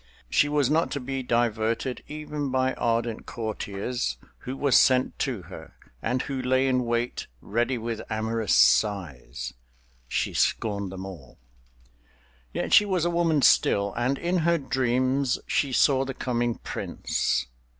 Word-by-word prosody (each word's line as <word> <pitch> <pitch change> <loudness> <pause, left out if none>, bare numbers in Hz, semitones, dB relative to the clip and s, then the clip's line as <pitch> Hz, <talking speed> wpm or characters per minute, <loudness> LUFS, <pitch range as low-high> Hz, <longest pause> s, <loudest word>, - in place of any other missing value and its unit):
She 145 - +3
was 145 -3 +2
not 160 +4 +2
to 140 - -2
be 135 +1 -4
diverted 115 0 0
even 150 -1 -4
by 130 0 +1
ardent 115 -1 -1
courtiers 110 - -3 0.2
who 130 +2 -6
were 140 0 0
sent 130 0 +4
to 125 -10 -2
her, 80 -2 -11 0.3
and 125 +3 -1
who 135 -2 -3
lay 130 +1 +2
in 125 -1 +1
wait 120 +1 -2
ready 120 - -1
with 115 -1 -4
amorous 110 -1 -1
sighs—she 60 - -1
scorned 100 -4 0
them 95 0 -7
all. 80 -10 -11 1.1
Yet - - -2
she - - +8
was 185 -4 0
a 175 - +1
woman 165 -4 +2
still, 100 0 +4
and 125 +4 0
in 175 +4 0
her 170 0 +2
dreams 130 -1 +1
she 140 - 0
saw 135 +1 +4
the 135 -1 -5
coming 120 -2 -1
prince. 60 - -2
120 Hz, 140 wpm, -26 LUFS, 105-135 Hz, 1.1 s, she